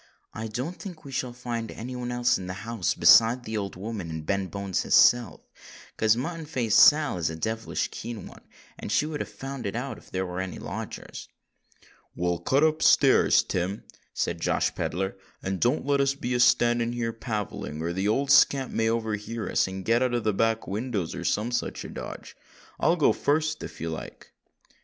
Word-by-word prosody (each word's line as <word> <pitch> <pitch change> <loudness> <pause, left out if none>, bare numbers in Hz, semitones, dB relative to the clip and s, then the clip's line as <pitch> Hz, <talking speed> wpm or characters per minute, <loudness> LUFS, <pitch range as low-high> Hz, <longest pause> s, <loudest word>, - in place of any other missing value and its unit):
"I 110 +1 -5
don't 130 +11 -5
think 180 -8 -9
we 140 - -8
shall 130 -1 -2
find 120 -2 -5
any 125 +3 -7
one 125 0 -4
else 120 0 +2
in 90 - -7
the 95 - -5
house 115 -5 -1
besides 120 +2 +6
that 110 - -4
old 100 -2 -3
woman 100 -2 -5
and 80 -1 -6
Ben 100 +2 -1
Bones 100 -2 -2
his - - +2
self, 120 -9 +4 0.5
'cause 110 +1 +3
Mutton 160 +4 -4
Face 120 -7 0
Sal 150 -10 +6
is 80 - 0
a 80 - -5
devilish 110 +6 -2
keen 115 -2 -7
one—and - - -12
she 150 - +2
would 155 -1 -4
have - - -4
found 135 -4 -6
it 100 - -4
out 120 -1 -4
if - - -20
there 95 0 -2
was 90 0 -4
any 95 -1 -5
lodgers." - - -7 0.9
"Well, 85 -1 -1
cut 140 +3 +2
up 155 0 +2
stairs, - - +5
Tim," 90 +3 -3 0.3
said - - -2
Josh - - +1
Pedler, 95 +3 -3 0.3
"and 95 -1 -2
don't 125 +5 +1
let 140 0 +2
us 140 0 +1
be 125 -2 -3
a 125 - +1
standing 120 -1 +3
here 115 -1 -2
palavering—or 100 -8 -4
the 95 +3 -1
old 135 +6 +1
scamp 135 -1 +5
may 110 0 +1
overhear 110 0 -3
us - - +1
and 95 0 -6
get 115 +2 +3
out 130 -1 +1
by - - +2
the 110 -3 0
back 115 +2 0
windows, 105 -4 -3
or - - -6
some 110 +4 0
such 120 - -3
a - - -7
dodge. - - -8 0.4
I'll 170 - +3
go 160 - +3
fust, 155 +1 0
if - - -8
you 80 0 -3
like." 80 - -9
115 Hz, 200 wpm, -26 LUFS, 100-130 Hz, 0.9 s, besides